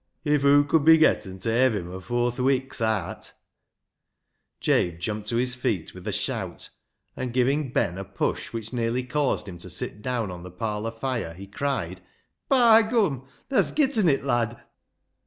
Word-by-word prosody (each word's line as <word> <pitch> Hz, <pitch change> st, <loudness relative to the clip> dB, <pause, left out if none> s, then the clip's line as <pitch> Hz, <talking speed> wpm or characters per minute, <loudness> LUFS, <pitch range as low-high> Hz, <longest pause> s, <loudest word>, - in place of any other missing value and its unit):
"If 150 Hz, -2 st, +2 dB
hoo 140 Hz, +1 st, +6 dB
could 145 Hz, +1 st, +2 dB
be 160 Hz, +1 st, +8 dB
getten 95 Hz, -11 st, +2 dB
ta 110 Hz, +4 st, -2 dB
hev 125 Hz, 0 st, +3 dB
him 90 Hz, -3 st, -5 dB
afoor 120 Hz, +6 st, -1 dB
th' 120 Hz, -, -12 dB
wik'a 130 Hz, -2 st, 0 dB
aat 110 Hz, -5 st, -2 dB, 0.6 s
"— -, -, -54 dB
Jabe 85 Hz, -1 st, +1 dB
jumped 105 Hz, +4 st, -4 dB
to 115 Hz, -, -1 dB
his 125 Hz, +1 st, +1 dB
feet 105 Hz, -9 st, -2 dB
with 90 Hz, -1 st, -10 dB
a -, -, 0 dB
shout, -, -, -3 dB, 0.5 s
and 125 Hz, -, -4 dB
giving 130 Hz, +3 st, +1 dB
Ben 90 Hz, -6 st, 0 dB
a -, -, -4 dB
push -, -, -3 dB
which 115 Hz, 0 st, -6 dB
nearly 120 Hz, +1 st, 0 dB
caused 130 Hz, -3 st, -1 dB
him 90 Hz, -3 st, -8 dB
to 90 Hz, -, -7 dB
sit 95 Hz, +4 st, -4 dB
down 115 Hz, -4 st, -2 dB
on 90 Hz, -1 st, -8 dB
the 90 Hz, -, -9 dB
parlour 105 Hz, +4 st, -3 dB
fire, 115 Hz, -7 st, -4 dB
he 95 Hz, +2 st, -9 dB
cried 135 Hz, +7 st, -3 dB, 0.2 s
— -, -, -46 dB
" -, -, -54 dB
By 230 Hz, -2 st, +7 dB
gum, 200 Hz, -, 0 dB, 0.2 s
tha's 270 Hz, -, +2 dB
getten 260 Hz, -, +2 dB
it, 135 Hz, -2 st, +1 dB
lad 120 Hz, -4 st, -1 dB
120 Hz, 185 wpm, -25 LUFS, 105-140 Hz, 0.6 s, be